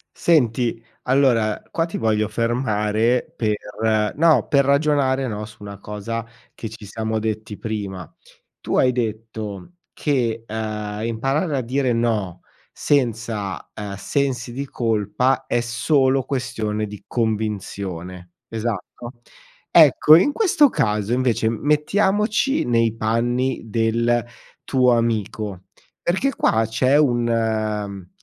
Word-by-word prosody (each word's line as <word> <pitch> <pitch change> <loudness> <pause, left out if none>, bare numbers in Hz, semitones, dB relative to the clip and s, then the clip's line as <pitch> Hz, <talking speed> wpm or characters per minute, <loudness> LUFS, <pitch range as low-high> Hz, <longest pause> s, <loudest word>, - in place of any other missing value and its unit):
Senti, 120 -7 +1 0.2
allora, 125 -5 +2
qua 165 - 0
ti 165 - -5
voglio 110 -1 +1
fermare 115 0 0
per 105 0 -1
no, 160 +1 +4
per 140 -1 +3
ragionare, 140 -2 +2
no, 105 -2 -4
su 110 - -14
una 100 -1 -8
cosa 105 +3 -5 0.3
che 115 - -6
ci 110 -1 -11
siamo 110 +2 -3
detti 110 -1 -4
prima. 100 -6 -5 0.5
Tu - - -2
hai 125 - +4
detto 110 - -4 0.2
che, 120 -6 -1
uhm, 105 -1 -4
imparare 135 +7 -1
a - - 0
dire 130 +1 0
no 110 -7 -1 0.3
senza, 115 -7 -1
ehm, 105 -2 -6
sensi 135 +2 -2
di 140 +3 -4
colpa 115 +1 0
è 120 - +1
solo 130 +3 +2
questione 115 -6 -2
di 105 -1 -10
convinzione, 100 -6 -3 0.2
esatto? 115 +2 -5 0.6
Ecco, 155 - +7
in 190 - +3
questo 320 -7 +4
caso 105 - 0
invece 125 -3 +1
m 115 -1 -2
mettiamoci 205 - +2
nei 115 -2 +2
panni 120 +4 0
del 115 +1 +1 0.4
tuo 125 -2 +3
amico, 105 -4 -2 0.4
perché 190 +11 0
qua 110 +1 +2
c'è 130 +5 +2
un, 120 -5 +2
uhm, 110 -4 -1
115 Hz, 120 wpm, -21 LUFS, 105-130 Hz, 0.6 s, Ecco